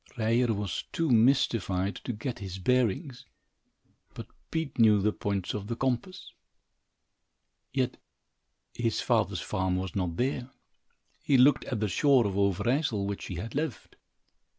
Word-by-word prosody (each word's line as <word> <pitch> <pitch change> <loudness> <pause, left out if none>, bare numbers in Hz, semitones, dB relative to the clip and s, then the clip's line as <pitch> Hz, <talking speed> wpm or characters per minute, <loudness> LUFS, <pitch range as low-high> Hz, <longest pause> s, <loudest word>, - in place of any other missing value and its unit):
Ryer 115 +2 +2
was 100 -3 -3
too 165 -4 0
mystified 110 -6 +2
to - - -2
get 115 +3 -5
his 95 -2 -6
bearings, 125 - 0 0.9
but - - -7 0.2
Pete 160 -6 -3
knew 110 -2 +6
the 105 +2 +1
points 100 -3 -2
of 105 -1 -5
the 115 - -3
compass. 135 +10 -3 1.4
Yet 130 -2 -1 0.8
his 115 -2 -1
father's - - +1
farm 95 -1 -1
was 95 -1 -4
not 90 -4 -2
there. 125 0 -1 0.7
He 140 - +3
looked 135 +3 +5
at 120 -5 -3
the 105 - +1
shore 130 - +3
of 100 - -1
Overijssel, 100 - +1
which 100 0 -4
he 90 - -6
had 110 +6 -6
left. 145 -5 -4
115 Hz, 140 wpm, -29 LUFS, 100-130 Hz, 1.4 s, knew